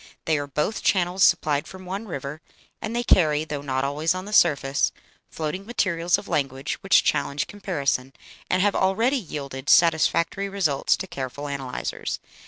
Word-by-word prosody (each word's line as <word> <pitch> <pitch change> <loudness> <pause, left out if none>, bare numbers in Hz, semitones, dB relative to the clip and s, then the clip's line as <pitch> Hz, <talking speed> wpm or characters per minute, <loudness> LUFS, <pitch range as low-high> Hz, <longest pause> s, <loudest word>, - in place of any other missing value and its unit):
They 155 -2 +2
are 145 - -4
both 150 +9 -2
channels 185 0 +2
supplied 145 -2 +3
from 185 0 -11
one 195 +4 -5
river, 140 -2 -6 0.4
and 225 +1 -4
they 240 - 0
carry, 155 -9 +3
though 150 -2 -4
not 130 -2 -1
always 150 +5 0
on 185 +1 -5
the 210 - -7
surface, 140 -7 +3 0.4
floating 160 +4 -4
materials 180 -6 +1
of - - -9
language 135 -2 -2
which - - +4
challenge 140 0 0
comparison, 140 -10 -2 0.4
and 185 +1 +2
have 205 -1 +2
already 225 +9 +2
yielded 140 - -6
satisfactory 170 +3 +3
results 180 -8 +1
to - - -5
careful 140 -3 -6
analyzers." 135 -3 -4
160 Hz, 160 wpm, -24 LUFS, 140-190 Hz, 0.4 s, which